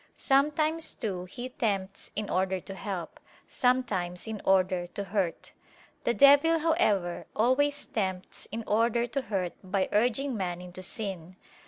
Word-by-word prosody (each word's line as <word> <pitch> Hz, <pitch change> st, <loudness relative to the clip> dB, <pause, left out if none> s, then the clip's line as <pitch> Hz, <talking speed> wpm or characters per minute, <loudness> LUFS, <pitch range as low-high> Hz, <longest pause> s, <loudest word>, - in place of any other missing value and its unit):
Sometimes 305 Hz, +4 st, +1 dB
too 190 Hz, -7 st, -3 dB
he 245 Hz, +7 st, -7 dB
tempts 200 Hz, -5 st, -2 dB
in 210 Hz, 0 st, -2 dB
order 190 Hz, 0 st, 0 dB
to 195 Hz, -, -9 dB
help, 190 Hz, -4 st, -5 dB, 0.3 s
sometimes 210 Hz, -9 st, 0 dB
in 220 Hz, -2 st, -5 dB
order 185 Hz, -2 st, +2 dB
to 200 Hz, -, -5 dB
hurt. 195 Hz, -4 st, -2 dB, 0.5 s
The 235 Hz, -, +3 dB
devil, 285 Hz, +4 st, +7 dB
however, 260 Hz, -, +1 dB
always 285 Hz, +6 st, +2 dB
tempts 190 Hz, -3 st, -3 dB
in 225 Hz, +2 st, -4 dB
order 230 Hz, +2 st, +2 dB
to 275 Hz, +3 st, -2 dB
hurt 190 Hz, -7 st, -2 dB
by 190 Hz, 0 st, 0 dB
urging 250 Hz, +5 st, +1 dB
man 180 Hz, -4 st, -2 dB
into 180 Hz, +1 st, -9 dB
sin. 185 Hz, -3 st, -4 dB
210 Hz, 140 wpm, -29 LUFS, 185-255 Hz, 0.5 s, devil